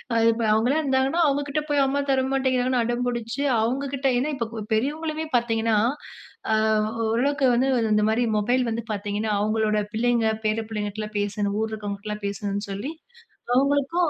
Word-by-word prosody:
அது 225 Hz, 0 st, +3 dB
இப்ப 230 Hz, 0 st, -3 dB
அவுங்கலாம் 250 Hz, +8 st, +2 dB
இருந்தாங்கன்னா, 270 Hz, +5 st, +1 dB
அவுங்க 285 Hz, +1 st, +1 dB
கிட்ட 300 Hz, +2 st, -1 dB
போய் 285 Hz, -1 st, +3 dB
அம்மா 280 Hz, +1 st, 0 dB
தர 260 Hz, -1 st, +2 dB
மாட்டேங்கிறாங்கன்னு 255 Hz, -2 st, +1 dB
அடம் 240 Hz, +1 st, -1 dB
புடிச்சு, 240 Hz, +2 st, -3 dB, 0.2 s
அவுங்க 260 Hz, +5 st, -1 dB
கிட்ட 275 Hz, 0 st, 0 dB
ஏன்னா 285 Hz, +5 st, 0 dB
இப்போ 230 Hz, -3 st, -4 dB
பெரியவங்களுமே 310 Hz, +7 st, -1 dB
பாத்தீங்கன்னா, 225 Hz, -2 st, +1 dB, 0.8 s
அ -, -, +4 dB, 0.5 s
ஓரளவுக்கு 275 Hz, +5 st, +1 dB
வந்து 255 Hz, +3 st, +2 dB, 0.3 s
இந்த 210 Hz, 0 st, +3 dB
மாரி 235 Hz, +3 st, +2 dB
மொபைல் 245 Hz, +5 st, +2 dB
வந்து 230 Hz, +1 st, -3 dB
பாத்தீங்கன்னா, 205 Hz, +1 st, -2 dB
அவுங்களோட 215 Hz, 0 st, +1 dB, 0.2 s
பிள்ளைங்க 235 Hz, 0 st, +2 dB, 0.2 s
பேர 215 Hz, +1 st, +1 dB
பிள்ளைங்ககிட்டலாம் 210 Hz, 0 st, -4 dB
பேசணும், 205 Hz, 0 st, -1 dB
ஊர்ல 220 Hz, 0 st, -2 dB
இருக்கறவங்ககிட்டலாம் 210 Hz, 0 st, -5 dB
பேசணுன்னு 200 Hz, 0 st, -3 dB
சொல்லி 205 Hz, +10 st, -4 dB, 0.6 s
அவங்களுக்கும், 285 Hz, +5 st, +2 dB
235 Hz, 155 wpm, -24 LUFS, 215-270 Hz, 0.8 s, அ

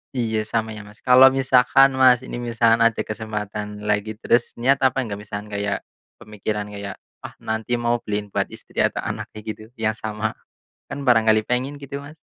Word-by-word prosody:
Iya. 110 Hz, -3 st, -1 dB
Sama 110 Hz, 0 st, -1 dB
ya, 105 Hz, -1 st, -7 dB
Mas. 105 Hz, -, -17 dB
Kalau 130 Hz, +1 st, +8 dB
misalkan 135 Hz, 0 st, +4 dB
Mas 130 Hz, -1 st, +6 dB
ini, 120 Hz, -, -6 dB
misalkan 115 Hz, -1 st, +2 dB
ada 115 Hz, -1 st, +3 dB
kesempatan 105 Hz, -1 st, -5 dB
lagi. 105 Hz, +1 st, -1 dB
Terus 120 Hz, +2 st, +1 dB
niat 135 Hz, +4 st, +2 dB
apa 130 Hz, 0 st, +2 dB
enggak, 100 Hz, -3 st, -5 dB
misalkan 105 Hz, 0 st, -7 dB
kayak, 100 Hz, 0 st, -2 dB, 0.4 s
pemikiran 105 Hz, 0 st, -4 dB
kayak, 100 Hz, -1 st, -6 dB, 0.3 s
ah -, -, -9 dB
nanti 110 Hz, +2 st, -1 dB
mau 120 Hz, 0 st, 0 dB
beliin 105 Hz, -3 st, -4 dB
buat -, -, 0 dB
istri -, -, -10 dB
atau -, -, +1 dB
anaknya, 110 Hz, -, -5 dB
gitu 110 Hz, 0 st, -6 dB
Yang 110 Hz, -1 st, -1 dB
sama. 110 Hz, 0 st, -3 dB, 0.6 s
Kan 140 Hz, -, -6 dB
barangkali 110 Hz, -3 st, +4 dB
pengen, 125 Hz, +4 st, -1 dB
gitu 140 Hz, 0 st, -6 dB
Mas? 145 Hz, +2 st, -12 dB
110 Hz, 175 wpm, -22 LUFS, 105-125 Hz, 0.6 s, Kalau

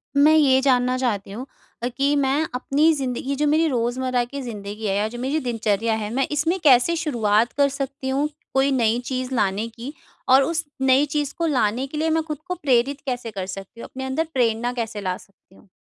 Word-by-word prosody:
मैं 295 Hz, +2 st, +6 dB
ये 275 Hz, -4 st, +5 dB
जानना 255 Hz, -2 st, +2 dB
चाहती 210 Hz, -6 st, -2 dB
हूँ 240 Hz, +6 st, -6 dB, 0.4 s
अ, 245 Hz, -, +1 dB
कि 275 Hz, +3 st, 0 dB
मैं 280 Hz, +2 st, +1 dB
अपनी 290 Hz, +5 st, +2 dB
ज़िंदगी 265 Hz, 0 st, -2 dB
जो 295 Hz, +2 st, +1 dB
मेरी 315 Hz, +2 st, +3 dB
रोजमर्रा 250 Hz, -1 st, 0 dB
की 280 Hz, +3 st, -7 dB
ज़िंदगी 210 Hz, -3 st, -6 dB
है 195 Hz, -, 0 dB
या 205 Hz, +2 st, +1 dB
जो 235 Hz, +2 st, -8 dB
मेरी 270 Hz, +5 st, -1 dB
दिनचर्या 225 Hz, -4 st, 0 dB
है, 215 Hz, -1 st, -4 dB
मैं 270 Hz, +2 st, +1 dB
इसमें 325 Hz, +5 st, 0 dB
कैसे 275 Hz, +3 st, +5 dB
शुरुआत 235 Hz, -8 st, +1 dB
कर 280 Hz, 0 st, +3 dB
सकती 275 Hz, -1 st, -4 dB
हूँ, 275 Hz, +3 st, +1 dB, 0.3 s
कोई 270 Hz, +1 st, +3 dB
नई 235 Hz, -3 st, +2 dB
चीज़ 255 Hz, 0 st, -3 dB
लाने 205 Hz, 0 st, 0 dB
की? 235 Hz, +5 st, -8 dB, 0.3 s
और 265 Hz, +1 st, +6 dB
उस 330 Hz, +2 st, -1 dB, 0.2 s
नई 265 Hz, +2 st, +4 dB
चीज़ 290 Hz, -2 st, -1 dB
को 335 Hz, -, 0 dB
लाने 255 Hz, -2 st, +1 dB
के 300 Hz, -, -7 dB
लिए 320 Hz, +1 st, +1 dB
मैं 320 Hz, 0 st, +1 dB
खुद 305 Hz, -2 st, -5 dB
को 360 Hz, -, -2 dB
प्रेरित 275 Hz, -3 st, +1 dB
कैसे 245 Hz, -4 st, -3 dB
कर 195 Hz, -2 st, -4 dB
सकती 195 Hz, +4 st, -8 dB
हूँ, -, -, -7 dB
अपने 265 Hz, -, -7 dB
अंदर 270 Hz, +5 st, -1 dB
प्रेरणा 240 Hz, -1 st, +1 dB
कैसे 225 Hz, -3 st, -4 dB
ला 185 Hz, -2 st, -2 dB
सकती 195 Hz, -1 st, -22 dB
हुँ? 210 Hz, -, -21 dB
260 Hz, 210 wpm, -23 LUFS, 230-280 Hz, 0.4 s, मैं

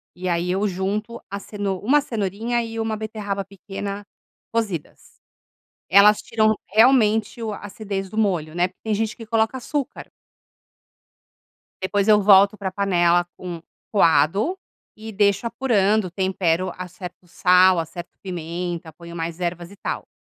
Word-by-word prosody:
e 180 Hz, 0 st, -3 dB
aí 175 Hz, +1 st, 0 dB
eu 195 Hz, +3 st, +1 dB
junto 205 Hz, +5 st, -3 dB
a 200 Hz, -, -4 dB
ceno 200 Hz, -2 st, -4 dB
1 280 Hz, +8 st, +3 dB
cenourinha 230 Hz, -1 st, -2 dB
e 225 Hz, 0 st, -6 dB
1 225 Hz, -1 st, -1 dB
beterraba 210 Hz, -2 st, -4 dB
pequena 200 Hz, +1 st, -7 dB, 0.5 s
cozidas. 205 Hz, -9 st, -4 dB, 0.7 s
Elas 205 Hz, +2 st, +6 dB
tiram, 215 Hz, -1 st, +2 dB, 0.2 s
realmente, 220 Hz, 0 st, +4 dB
o 220 Hz, -, -2 dB
a 205 Hz, -, -6 dB
acidez 200 Hz, -2 st, -5 dB
do 215 Hz, -, -8 dB
molho, 175 Hz, -7 st, 0 dB
né? 175 Hz, +1 st, +2 dB
Porque 185 Hz, -, -24 dB
tem 220 Hz, -1 st, -1 dB
gente 215 Hz, +1 st, -1 dB
que 225 Hz, -, -9 dB
coloca 225 Hz, +2 st, +1 dB
açúcar. 275 Hz, +2 st, -4 dB, 1.7 s
Depois 200 Hz, +2 st, 0 dB
eu 210 Hz, -1 st, +6 dB
volto 200 Hz, +1 st, +6 dB
para 190 Hz, -2 st, -4 dB
panela 175 Hz, -3 st, +2 dB
com 175 Hz, -2 st, -7 dB, 0.3 s
coado 195 Hz, -, +3 dB, 0.4 s
e 220 Hz, 0 st, -8 dB
deixo 200 Hz, +2 st, +2 dB
apurando, 220 Hz, -5 st, +1 dB
tempero, 185 Hz, -1 st, 0 dB
acerto 180 Hz, 0 st, -8 dB
o -, -, -24 dB
sal, 180 Hz, +1 st, +5 dB
acerto 170 Hz, +2 st, -6 dB
pimenta, 170 Hz, -2 st, -5 dB
ponho 170 Hz, +1 st, -11 dB
mais 165 Hz, +1 st, -4 dB
ervas 175 Hz, 0 st, -3 dB
e 200 Hz, -, -14 dB
tal. -, -, -4 dB
200 Hz, 145 wpm, -22 LUFS, 180-215 Hz, 1.7 s, Elas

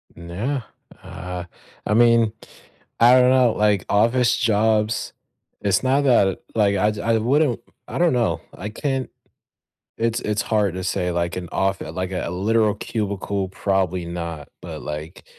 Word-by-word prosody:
Nah. 100 Hz, +11 st, -3 dB, 0.4 s
Ah, 90 Hz, 0 st, -7 dB, 0.4 s
I 105 Hz, -, 0 dB
mean, 115 Hz, -1 st, +4 dB, 0.7 s
I 125 Hz, +2 st, +7 dB
dunno. 125 Hz, -2 st, +4 dB
Like, 105 Hz, -3 st, +1 dB
office 115 Hz, +4 st, +3 dB
jobs 110 Hz, -1 st, +1 dB, 0.5 s
it's 100 Hz, -2 st, +2 dB
not 135 Hz, +2 st, +3 dB
that, 100 Hz, -7 st, +4 dB, 0.2 s
like, 100 Hz, -2 st, +3 dB
I 105 Hz, +3 st, +2 dB
j 105 Hz, -1 st, -6 dB
I 115 Hz, -1 st, +2 dB
wouldn't 125 Hz, +2 st, +2 dB, 0.3 s
I -, -, -5 dB
don't 175 Hz, -4 st, +3 dB
know. 120 Hz, -3 st, 0 dB, 0.2 s
I 105 Hz, +3 st, -5 dB
can't 135 Hz, +2 st, -2 dB, 0.9 s
it's 115 Hz, +1 st, 0 dB
it's 105 Hz, 0 st, -1 dB
hard 105 Hz, -5 st, 0 dB
to 95 Hz, -1 st, -4 dB
say, 90 Hz, -1 st, -1 dB
like, 85 Hz, 0 st, -2 dB
an 90 Hz, -2 st, -5 dB
off 95 Hz, 0 st, 0 dB
like, 90 Hz, +4 st, -4 dB
a 90 Hz, -, -2 dB
literal 105 Hz, +3 st, +1 dB
cubicle, 100 Hz, -3 st, -3 dB
probably 95 Hz, -2 st, -1 dB
not, 85 Hz, -3 st, -6 dB
but, 80 Hz, -3 st, -7 dB
like, 75 Hz, +2 st, -7 dB
105 Hz, 150 wpm, -22 LUFS, 90-115 Hz, 0.9 s, I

